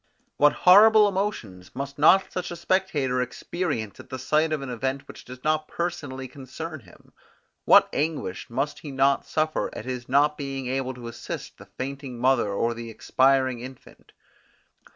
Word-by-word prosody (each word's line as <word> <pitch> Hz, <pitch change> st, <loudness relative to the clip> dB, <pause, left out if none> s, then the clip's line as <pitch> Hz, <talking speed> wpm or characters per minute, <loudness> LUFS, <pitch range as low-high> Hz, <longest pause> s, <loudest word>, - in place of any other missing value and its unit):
What 145 Hz, +1 st, +5 dB
horrible 210 Hz, +3 st, +8 dB
emotions 120 Hz, -, -4 dB
must 140 Hz, +2 st, -6 dB
not 190 Hz, +6 st, +5 dB
such 180 Hz, -1 st, -3 dB
a 175 Hz, -, -5 dB
spectator 155 Hz, -8 st, 0 dB
experience 125 Hz, -, -4 dB
at -, -, -12 dB
the 130 Hz, -, -5 dB
sight 155 Hz, +5 st, +1 dB
of 150 Hz, -3 st, -2 dB
an 135 Hz, -, -6 dB
event 130 Hz, +3 st, -3 dB
which -, -, -11 dB
does 125 Hz, 0 st, -11 dB
not 155 Hz, 0 st, 0 dB
personally 145 Hz, -7 st, -4 dB
concern 140 Hz, +4 st, -8 dB
him? 90 Hz, -8 st, -20 dB, 0.5 s
What -, -, +7 dB
anguish 145 Hz, -, -3 dB
must 140 Hz, +5 st, -2 dB
he 150 Hz, -, -9 dB
not 135 Hz, 0 st, +1 dB
suffer 155 Hz, 0 st, -1 dB
at -, -, -7 dB
his 125 Hz, -1 st, -5 dB
not 145 Hz, +3 st, +3 dB
being 135 Hz, -2 st, -4 dB
able 130 Hz, 0 st, -2 dB
to 120 Hz, -1 st, -9 dB
assist 115 Hz, -, -7 dB
the -, -, -13 dB
fainting 135 Hz, -1 st, -5 dB
mother 125 Hz, -3 st, +2 dB
or 115 Hz, +4 st, 0 dB
the 115 Hz, 0 st, -8 dB
expiring 130 Hz, +2 st, +2 dB
infant? 130 Hz, +1 st, -12 dB
135 Hz, 165 wpm, -25 LUFS, 125-155 Hz, 0.5 s, horrible